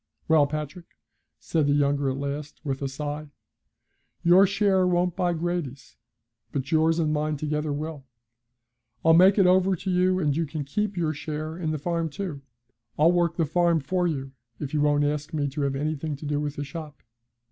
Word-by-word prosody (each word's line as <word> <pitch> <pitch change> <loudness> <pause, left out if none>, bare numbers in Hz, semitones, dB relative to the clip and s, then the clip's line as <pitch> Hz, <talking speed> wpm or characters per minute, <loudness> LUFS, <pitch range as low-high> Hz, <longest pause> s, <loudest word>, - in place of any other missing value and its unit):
'Well, 155 -3 +5
Patrick,' 155 +3 -6 0.4
said 155 -3 0
the 145 0 +3
other 140 -1 0
at 130 - -2
last, 140 +1 -5
with 135 -3 -3
a 140 - -1
sigh, 145 +2 -5 1.0
'your 180 +3 +6
share 195 -2 +2
won't 180 -1 +1
buy 175 -1 +1
Grady's, 165 -6 -4 0.6
but 135 +1 -3
yours 160 +1 +3
and 155 -2 +1
mine 150 0 -1
together 150 +1 -2
will. 150 0 -5 1.0
I'll 165 - +7
make 185 +4 +6
it 195 - +5
over 185 +1 +4
to 185 +2 -4
you, 185 +1 +2
and 150 -5 +1
you 165 0 -1
can 150 0 -4
keep 205 +7 -2
your 160 -3 0
share 155 +1 -5
in 170 -2 -3
the 155 - -1
farm 165 +2 -2
too. 160 -3 -5 0.6
I'll 160 +3 +5
work 170 -2 +1
the 165 - +1
farm 170 +2 +2
for 180 +4 0
you 135 -4 -3 0.3
if 145 -1 -5
you 150 - +1
won't 145 0 +3
ask 150 +1 -2
me 145 -2 0
to 140 +2 -4
have 140 -1 0
anything 150 +1 -2
to 145 - -10
do 145 0 -1
with 145 -1 -3
the 145 - -3
shop. 150 0 -9
155 Hz, 190 wpm, -26 LUFS, 145-175 Hz, 1.0 s, I'll